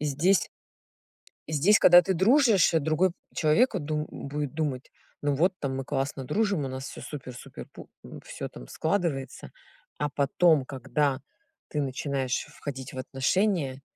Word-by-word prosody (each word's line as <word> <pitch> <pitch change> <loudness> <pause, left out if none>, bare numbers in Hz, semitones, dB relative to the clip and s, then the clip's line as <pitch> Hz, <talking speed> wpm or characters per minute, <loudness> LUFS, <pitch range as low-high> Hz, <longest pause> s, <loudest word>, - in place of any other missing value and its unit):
здесь 150 +6 +2 1.0
здесь, 160 +8 +4
когда 175 0 +8
ты 190 +2 -1
дружишь, 220 - +4
другой 160 +3 +2 0.2
человеку 190 +10 +3
от 160 - -4
ду 150 0 -2
будет 145 0 -5
думать: 145 -5 -3 0.3
"Ну 145 -1 0
вот, 180 +7 +2
там 135 -2 -3
мы 135 - -4
классно 135 0 -3
дружим, 200 - 0
у 135 - -3
нас 130 +1 -6
всё - - -9
супер-супер 130 -4 -9
пу - - -13
м, - - -10
всё - - -6
там - - -12
складывается". 160 - -2 0.5
А 150 - 0
потом, 145 +2 +2
когда 135 +1 -1 0.5
ты 150 - -2
начинаешь 135 -1 -2
входить 135 -4 -7
в 130 - -6
отношения, 140 +1 0
150 Hz, 145 wpm, -27 LUFS, 135-175 Hz, 1.0 s, когда